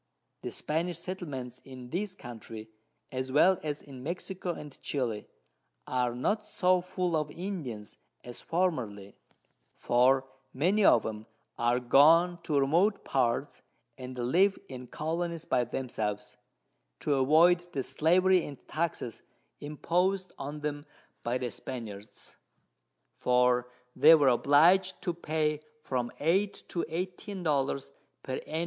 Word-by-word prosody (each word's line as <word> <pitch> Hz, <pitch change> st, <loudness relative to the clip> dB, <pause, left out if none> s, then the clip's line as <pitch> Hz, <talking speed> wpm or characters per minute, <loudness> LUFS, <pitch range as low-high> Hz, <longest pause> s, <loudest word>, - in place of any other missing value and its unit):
The -, -, -4 dB
Spanish 165 Hz, +2 st, -2 dB
Settlements 165 Hz, -9 st, -6 dB
in 130 Hz, -2 st, -11 dB
this 185 Hz, +2 st, -2 dB
Country, 115 Hz, -, -9 dB, 0.4 s
as 130 Hz, 0 st, -3 dB
well 175 Hz, +6 st, +5 dB
as 150 Hz, -1 st, -4 dB
in 135 Hz, -3 st, -11 dB
Mexico 175 Hz, +4 st, -4 dB
and 150 Hz, -4 st, -8 dB
Chili, 120 Hz, -7 st, -2 dB, 0.6 s
are 125 Hz, -1 st, 0 dB
not 210 Hz, -, 0 dB
so 185 Hz, -3 st, +2 dB
full 180 Hz, -1 st, -2 dB
of 150 Hz, -1 st, 0 dB
Indians 150 Hz, -, -6 dB, 0.3 s
as 120 Hz, -1 st, -9 dB
formerly; 120 Hz, -, -2 dB, 0.6 s
for 130 Hz, +2 st, +3 dB, 0.3 s
many 185 Hz, +10 st, +2 dB
of 115 Hz, -, +5 dB
'em 110 Hz, 0 st, -5 dB, 0.3 s
are 120 Hz, +1 st, +1 dB
gone 165 Hz, +7 st, +5 dB
to 150 Hz, -4 st, +1 dB
remote 170 Hz, +10 st, +2 dB
Parts, 130 Hz, +2 st, 0 dB, 0.3 s
and 130 Hz, 0 st, -8 dB
live 180 Hz, +12 st, +3 dB
in 125 Hz, -1 st, -8 dB
Colonies 165 Hz, +2 st, -3 dB
by 125 Hz, -, +2 dB
themselves, 110 Hz, -5 st, -4 dB, 0.7 s
to 145 Hz, -, +1 dB
avoid 155 Hz, +6 st, +5 dB
the 135 Hz, -5 st, -2 dB
Slavery 180 Hz, +5 st, +3 dB
and 140 Hz, -, -7 dB
Taxes 155 Hz, -8 st, -3 dB, 0.4 s
impos'd 180 Hz, +6 st, 0 dB
on 145 Hz, +2 st, -5 dB
them 145 Hz, 0 st, -4 dB, 0.3 s
by 120 Hz, +2 st, -1 dB
the 125 Hz, -2 st, -3 dB
Spaniards, 105 Hz, -4 st, -8 dB, 0.8 s
for 125 Hz, 0 st, +2 dB, 0.2 s
they 165 Hz, -, +8 dB
were 145 Hz, -4 st, +4 dB
oblig'd 170 Hz, +9 st, +4 dB
to 175 Hz, -, -1 dB
pay 155 Hz, -2 st, -1 dB, 0.2 s
from 125 Hz, -4 st, -2 dB
8 190 Hz, +7 st, +1 dB
to 170 Hz, -, -2 dB
14 185 Hz, +3 st, -5 dB
Dollars 140 Hz, -2 st, 0 dB, 0.3 s
_per 130 Hz, -, -4 dB
Ann. 160 Hz, -, -2 dB
145 Hz, 130 wpm, -30 LUFS, 125-175 Hz, 0.8 s, they